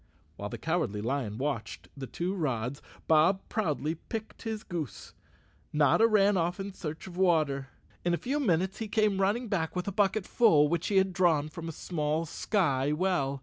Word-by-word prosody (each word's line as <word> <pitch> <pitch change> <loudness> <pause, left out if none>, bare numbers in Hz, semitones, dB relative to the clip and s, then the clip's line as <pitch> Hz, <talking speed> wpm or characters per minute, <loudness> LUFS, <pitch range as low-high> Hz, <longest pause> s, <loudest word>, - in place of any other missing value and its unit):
While 100 +5 -5
the - - -6
Cowardly 160 - -1
Lion 115 -2 -2
watched 115 - -3
the 135 -1 -6
two 175 +7 -3
rods, 135 - -2 0.2
and - - -26
Bob 165 +5 +5
proudly 155 - -1
picked 220 +6 -7
his 220 -1 -4
goose, 160 - -6 0.6
Notta 150 +9 +4
ran 205 -2 +4
off 175 +2 0
in 195 0 -5
search 160 -4 -6
of 180 -2 -9
water. 155 -7 +2 0.4
In 175 0 +2
a - - -3
few 275 +9 -2
minutes 190 - +1
he 225 - -3
came 210 -2 +1
running 220 +6 +1
back 180 -6 -1
with 180 +1 -2
a - - 0
bucket 200 0 +1
full 160 -12 +5
which 170 0 -1
he 205 - -1
had 190 -1 +3
drawn 165 -5 +2
from 165 +1 -7
a - - -3
small 155 0 -2
sky 145 -7 0
well. 150 -5 0
170 Hz, 190 wpm, -29 LUFS, 145-195 Hz, 0.6 s, Bob